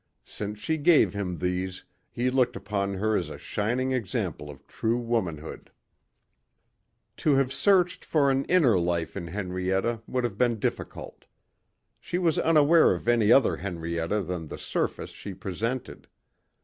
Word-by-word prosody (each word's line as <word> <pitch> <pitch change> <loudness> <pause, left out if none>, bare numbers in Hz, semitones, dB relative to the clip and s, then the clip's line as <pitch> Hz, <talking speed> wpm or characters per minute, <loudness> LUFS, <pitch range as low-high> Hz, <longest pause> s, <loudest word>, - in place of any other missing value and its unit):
Since 105 0 -6
she 160 +9 -2
gave 155 +1 +4
him 95 -4 -3
these 90 +1 -3 0.3
he 125 +1 -1
looked 125 -2 +2
upon 100 -1 -2
her 110 +3 0
as - - -1
a - - -7
shining 120 +5 -1
example 100 - -3
of 70 -1 -12
true 115 +1 -1
womanhood. 100 -11 -3 1.5
To 150 -3 +2
have 135 -1 +1
searched 180 -1 +2
for 140 -3 +2
an 135 0 +1
inner 140 - +4
life 85 -2 -1
in 90 -4 -5
Henrietta 95 +4 -2
would 125 -1 -1
have 110 -4 -3
been 120 -2 +2
difficult. - - -5 0.7
She 175 - -3
was 170 -4 +1
unaware 160 - +5
of 90 - -9
any 115 -2 +4
other 135 -1 +5
Henrietta 85 +1 -2
than 85 -2 -5
the - - -7
surface - - -3
she 100 - -8
presented. 115 +8 -4
110 Hz, 150 wpm, -27 LUFS, 90-130 Hz, 1.5 s, unaware